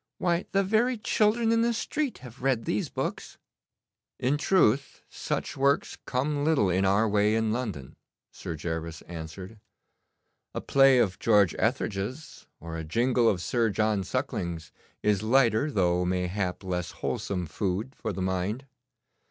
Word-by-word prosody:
Why, 175 0 0
the 195 0 +3
very 230 +5 +2
children 220 +2 +2
in 230 0 +3
the 235 0 +2
street 285 +4 -2
have 125 +1 -12
read 130 -3 +1
these 105 - -1
books.' - - -4 0.8
'In 130 +4 +1
truth, 140 - +2
such - - -3
works 140 +1 +1
come 145 +3 0
little 145 - +3
in 95 +2 +2
our 100 +4 +3
way 105 +1 +2
in 110 -1 +1
London,' 105 - -4 0.4
Sir 85 - -6
Gervas 80 0 -5
answered. 90 +5 -8 1.0
'A - - -2
play 135 -1 +5
of 95 -6 +1
George 105 -6 +4
Etherege's, 115 +11 -2
or 80 0 -6
a - - -4
jingle 120 +8 +2
of 90 -4 0
Sir 115 +2 +1
John 105 0 +1
Suckling's 85 -2 -3 0.3
is 105 -2 +2
lighter, 120 +3 +3
though 90 -7 +1
mayhap 90 +1 -2
less 90 -3 -2 0.2
wholesome 90 -3 -2
food 100 - -3
for - - -4
the 95 - -3
mind. 95 +7 -2
110 Hz, 145 wpm, -27 LUFS, 90-135 Hz, 1.0 s, play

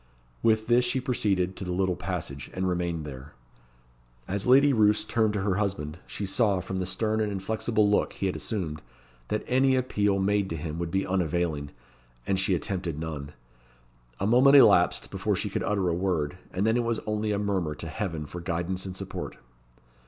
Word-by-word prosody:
With 110 -1 +3
this 120 +2 +4
she 125 +2 0
proceeded 100 -8 0
to 95 - -4
the 90 - -4
little 95 0 +1
passage, 80 -7 -5
and 95 0 -1
remained 85 -3 -1
there. 70 0 -9 0.9
As 100 +3 -2
Lady 140 +3 +6
Roos 105 -2 +3
turned 110 -2 +1
to 100 -2 -1
her 95 -2 +1
husband, 90 -6 -2
she 100 - -4
saw, 100 -1 +2
from 95 +1 -4
the 90 - -2
stern 110 +3 0
and 105 -1 0
inflexible 105 +2 0
look 105 - +2
he - - -3
had 95 - 0
assumed, 80 -9 -3 0.5
that 105 - -2
any 130 +1 +3
appeal 105 -6 +1
made 100 0 +1
to 80 - -3
him 80 +1 -5
would 85 -1 -2
be 95 +3 0
unavailing, 85 -5 -1 0.6
and 95 - +1
she 95 0 +3
attempted 85 -1 -3
none. 75 -2 -5 0.9
A 95 - -1
moment 125 +6 +6
elapsed 90 -10 +5
before - - -1
she - - -2
could - - -1
utter 100 -3 0
a 85 - +1
word, 85 -4 -1 0.2
and 95 +3 -1
then 110 +2 +3
it 120 - +1
was 115 -1 0
only 105 0 -1
a 105 - 0
murmur 95 -7 -1
to 80 - -6
heaven 80 -3 -4
for 90 +4 -7
guidance 90 +2 -2
and 95 0 -6
support. - - -6
95 Hz, 190 wpm, -27 LUFS, 85-105 Hz, 0.9 s, Lady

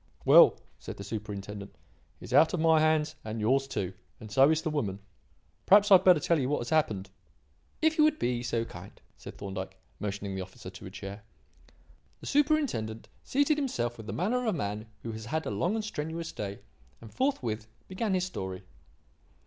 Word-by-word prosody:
"Well," - - +8 0.2
said - - -8
the 100 - -7
Superintendent, 105 -1 -6 0.4
"he - - -14
is - - -7
out 160 +2 +5
of - - -3
my 160 0 +5
hands 155 0 +2
and 110 +1 -5
yours 135 +5 +2
too; 95 -7 -3 0.3
and 110 -1 -10
so 135 +5 +6
is 160 0 +1
the 160 - -1
woman. 105 -11 -1 0.7
Perhaps 205 +1 +6
I - - +11
had 185 - +8
better 180 -4 +6
tell 165 +2 +2
you 130 -1 0
what 145 - +1
has 120 - -5
happened." 110 -12 +1 0.7
"If 320 0 +3
you - - +7
would 310 0 +2
be 120 -1 -1
so 120 -1 -1
kind," 90 -2 -11 0.2
said - - -11
Thorndyke, 95 -1 -6 0.2
motioning 100 -1 -4
the 95 - -3
officer 95 0 -9
to - - -10
a - - -7
chair. 100 +2 -8 1.0
The - - -12
superintendent 280 - 0
seated 285 +2 +2
himself 120 - -2
with 110 -2 -10
the - - -4
manner 215 +9 0
of 245 - -3
a 205 -6 +1
man 105 -2 -3 0.2
who 115 - -4
has 110 0 -7
had 160 +6 -2
a - - -2
long 180 +6 0
and 220 -1 -2
strenuous 165 -3 -4
day, 100 -1 -6 0.4
and 110 - -13
forthwith 120 - -1 0.2
began 190 +1 -1
his 185 0 +1
story. 95 - -5
130 Hz, 195 wpm, -29 LUFS, -, 1.0 s, I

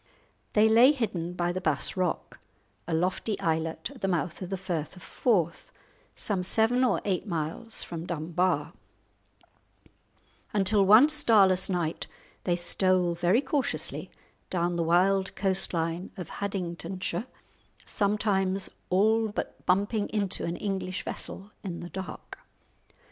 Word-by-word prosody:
They 215 +1 +5
lay 235 +6 +7
hidden 185 - -2
by 175 -1 0
the 185 +1 -3
Bass 155 -5 +1
Rock, 185 -3 -2 0.5
a 170 - -2
lofty 185 +5 -1
islet 160 - -1
at 265 - -15
the 195 - 0
mouth 175 -1 -1
of 180 - -5
the 195 - -2
Firth 175 -4 -4
of 180 - -13
Forth, 180 -7 0 0.4
some 200 -4 -1
seven 225 +7 +2
or 250 - +2
eight 195 +1 -1
miles 170 +6 -2
from 170 0 -6
Dunbar, 170 -1 -1 1.8
until 205 0 +3
one 220 +8 +8
starless 210 -12 +4
night 170 -3 -2 0.4
they 175 - +2
stole 180 0 +2
very 175 +8 +2
cautiously 275 -1 -2 0.4
down 175 -1 0
the 170 - 0
wild 185 +3 +2
coast 190 -1 -1
line 165 +2 -2
of 180 - -7
Haddingtonshire, 185 +2 -4 0.6
sometimes 200 -2 0 0.2
all 220 +4 +3
but 210 - -5
bumping 205 +3 +1
into 200 -2 0
an 170 - -2
English 190 -2 -3
vessel 200 +2 -6
in 180 -4 -5
the 175 - -7
dark. 190 -4 -8
185 Hz, 130 wpm, -28 LUFS, 175-205 Hz, 1.8 s, one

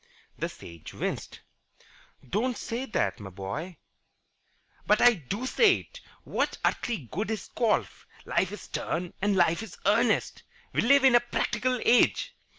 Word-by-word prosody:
The - - -3
Sage 85 -2 -11
winced. - - -4 0.9
"Don't 235 - -1
say 240 +3 -4
that, 220 - -1
my 100 -2 -8
boy." 105 - -6 1.1
"But 210 +1 +4
I 245 0 +7
do 200 - -5
say 395 - +4
it. - - -15 0.2
What - - -1
earthly 215 - -1
good 205 +4 -2
is 220 -1 -4
golf? 230 -3 -1 0.2
Life 185 - 0
is 210 - -7
stern 175 +1 -4
and 205 0 +2
life 175 0 +3
is 225 -5 -9
earnest. - - +2 0.3
We - - +2
live 275 +3 +5
in 265 -2 +6
a 240 - +8
practical 240 +1 -1
age. 245 - +3
215 Hz, 150 wpm, -28 LUFS, 170-245 Hz, 1.1 s, a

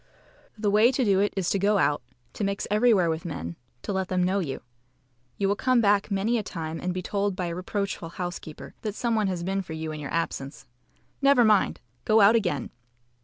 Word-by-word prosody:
The 210 -1 0
way 215 +4 +5
to 255 -1 +1
do 195 -2 +3
it 205 +1 +2
is 185 -3 0
to 200 - +1
go 205 +2 +3
out, 145 -6 +2 0.3
to - - -4
mix 200 0 -1
everywhere 210 -4 +4
with 160 0 -2
men, 85 - -5 0.3
to 205 - -3
let 190 -1 -1
them 185 -1 0
know 190 +2 +1
you. 145 -8 -4 0.7
You 200 - +1
will 200 - +2
come 255 +3 +2
back 205 -2 +3
many 215 +4 +1
a - - -1
time 165 -4 -5
and 180 - -1
be 180 0 -4
told 200 0 -1
by 180 - -2
a 170 - -3
reproachful 195 -2 -3
housekeeper 175 -3 -7
that 210 -2 -4
some 235 0 -1
one 215 -2 +1
has 180 -2 -2
been 195 +2 -1
for 170 -4 -8
you 160 0 -4
in 155 - -6
your 145 -2 -6
absence. 150 -4 -3 0.6
Never 275 -3 +5
mind! 210 -3 +3 0.2
Go 215 +1 +4
out 210 +2 +7
again. 175 - -1
195 Hz, 220 wpm, -26 LUFS, 170-210 Hz, 0.7 s, out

